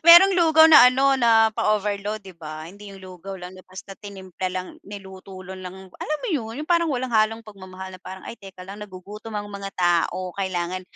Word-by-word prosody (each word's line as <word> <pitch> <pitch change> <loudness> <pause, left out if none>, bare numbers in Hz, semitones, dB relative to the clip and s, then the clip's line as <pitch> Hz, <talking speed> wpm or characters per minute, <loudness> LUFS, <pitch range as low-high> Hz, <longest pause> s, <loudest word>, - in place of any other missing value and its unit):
Merong 365 +3 +9
lugaw 320 -2 +6
na 300 - +10
ano 270 +1 +3
na 225 -2 +5
pa-overload, 210 0 -1
di 190 -2 -12
ba? 155 -1 -8
Hindi 200 +3 -12
yung 195 - -13
lugaw 185 +1 -9
lang 180 +1 -9
na 185 - -13
basta 190 +1 -10
tinimpla 190 -2 -6
lang, 185 0 -4 0.2
niluto 190 -1 -10
lo 190 +1 -8
lang, 185 0 -8 0.2
alam 305 +9 -4
mo - - -3
yun, 250 -3 -3
yung 315 - -11
parang 335 -1 +3
walang 255 -1 -2
halong 220 +1 +2
pagmamahal, 190 -2 -10
na 185 - -13
parang, 190 0 -9
ay 235 - -8
teka 190 -2 -12
lang 200 +2 -9
nagugutom 210 +3 -10
ang 205 0 -4
mga 200 -1 -6
tao, 175 +1 0
kailangan, 185 -1 -2
195 Hz, 205 wpm, -23 LUFS, 185-225 Hz, 0.2 s, na